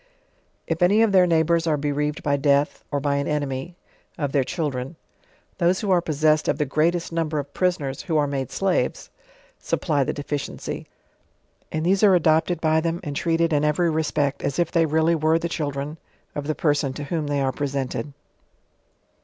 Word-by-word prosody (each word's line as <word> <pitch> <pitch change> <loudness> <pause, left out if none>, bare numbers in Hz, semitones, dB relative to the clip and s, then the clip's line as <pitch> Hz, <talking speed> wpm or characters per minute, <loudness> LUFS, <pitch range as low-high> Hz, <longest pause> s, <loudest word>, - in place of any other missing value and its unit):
If 165 +1 -3
any 205 +5 +5
of 225 - +2
their 185 -2 +5
neighbours 165 0 +2
are 155 -2 +2
bereaved 150 +1 -2
by 145 -1 +2
death, 140 +1 +1
or 145 - 0
by 140 0 0
an 140 - -1
enemy, 145 +2 -3 0.4
of 145 -5 -2
their 135 -1 +2
children, 135 -1 -3 0.6
those 180 +1 +2
who 205 -3 -1
are 180 -2 +4
possessed 155 -1 +1
of - - +1
the 150 - 0
greatest 165 +6 0
number 165 -2 -1
of 145 -1 -4
prisoners, 170 -8 -1
who 160 -3 -1
are 150 - +3
made 135 -3 -3
slaves, 195 -2 -1 0.5
supply 145 -5 0
the - - -1
deficiency: 145 -1 -5 0.8
and 155 +1 -2
these 190 +2 +3
are 200 -3 +6
adopted 160 0 +2
by 160 -1 +2
them 165 +1 -1
and 145 -1 -5
treated 165 +1 +1
in 145 0 +2
every 155 +3 +2
respect 150 -3 0
as 140 - -2
if 170 -2 +1
they 165 -2 +3
really 160 +2 +2
were 160 0 +2
the 170 - -2
children 150 -1 -4 0.3
of 145 -1 -5
the 155 - -1
person 145 -3 +1
to 145 - -6
whom 155 +1 -2
they 145 -1 0
are 135 -1 +1
presented. 140 +1 -3
155 Hz, 185 wpm, -23 LUFS, 145-170 Hz, 0.8 s, are